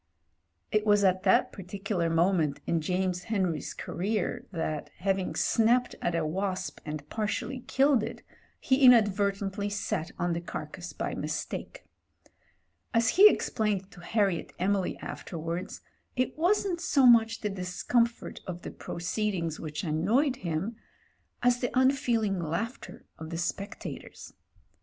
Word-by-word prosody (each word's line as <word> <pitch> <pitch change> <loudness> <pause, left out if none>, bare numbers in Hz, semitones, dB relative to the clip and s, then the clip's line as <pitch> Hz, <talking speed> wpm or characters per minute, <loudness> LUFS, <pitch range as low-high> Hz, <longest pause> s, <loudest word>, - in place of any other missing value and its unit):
It 215 0 +2
was 205 -1 +4
at 185 -1 +3
that 190 - +4
particular 195 -2 -3
moment 165 -3 +2
in 165 -1 +1
James 180 +2 -1
Henry's 185 -8 -1
career 200 +2 -2
that, 160 -4 -3
having 190 0 -1
snapped 240 +2 +3
at 175 - 0
a 165 -2 0
wasp 190 +4 -2
and 150 -1 -5
partially 220 +4 -2
killed 270 -2 +4
it, - - -6 0.4
he 265 +1 +2
inadvertently 205 -4 +4
sat 200 -5 -2
on 175 0 0
the 170 - -2
carcase 170 - -6
by - - -3
mis - - -2
take. - - -7 1.1
As 230 0 +4
he 410 +3 +9
explained 205 - -1
to - - -14
Harriet 195 -2 0
Emily 195 +1 0
afterwards, 170 +1 -5 0.3
it 255 0 0
wasn't 355 +1 +1
so 275 -6 +3
much 225 -2 +5
the 210 - -1
discomfort 215 +6 -1
of 175 -1 -6
the - - -6
proceeding 180 -1 -2
which 150 -1 -5
annoyed 215 - +1
him, 180 +5 -3 0.7
as 245 0 +4
the 245 - 0
unfeeling 240 -7 +2
laughter 175 - -4
of 160 0 -7
the 165 - -4
spectators. 185 +4 -5
195 Hz, 135 wpm, -29 LUFS, 175-230 Hz, 1.1 s, he